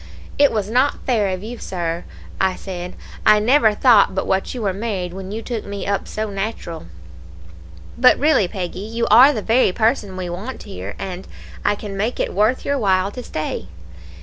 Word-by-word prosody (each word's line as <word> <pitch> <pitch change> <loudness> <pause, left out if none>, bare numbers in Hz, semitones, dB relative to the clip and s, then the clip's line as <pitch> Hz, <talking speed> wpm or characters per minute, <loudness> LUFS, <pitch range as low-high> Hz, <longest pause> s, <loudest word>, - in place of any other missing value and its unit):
"'It 285 -1 +6
was 210 -3 -1
not 255 +6 +1
fair 225 -6 +2
of 185 0 -3
you, 230 +2 -7
Sir,' 170 -2 -4 0.3
I 190 -1 +2
said; 180 -2 -7 0.3
'I 215 0 +6
never 220 0 +4
thought 210 -5 +5
but 190 - -1
what 190 +6 -1
you 240 - -4
were 195 -2 0
married 195 -4 -3
when 190 +1 -7
you 225 +2 -5
took 235 -2 -4
me 200 0 -6
up 200 0 -1
so 215 -1 -4
natural.' 195 - -5 1.1
"'But 255 0 +6
really, 285 - +3
Peggy, 180 -1 -5
you 230 +3 -2
are 250 +6 +9
the 220 -7 -3
very 230 -3 +3
person 205 -2 0
we 185 -1 -4
want 195 +9 -6
here, 95 +2 -7
and 185 -1 -6 0.4
I - - +2
can 205 -1 -7
make 215 +5 -2
it - - -1
worth 215 +6 +1
your 280 -1 0
while 190 -2 +2
to 250 - -7
stay. 155 - -4
205 Hz, 190 wpm, -20 LUFS, 185-230 Hz, 1.1 s, are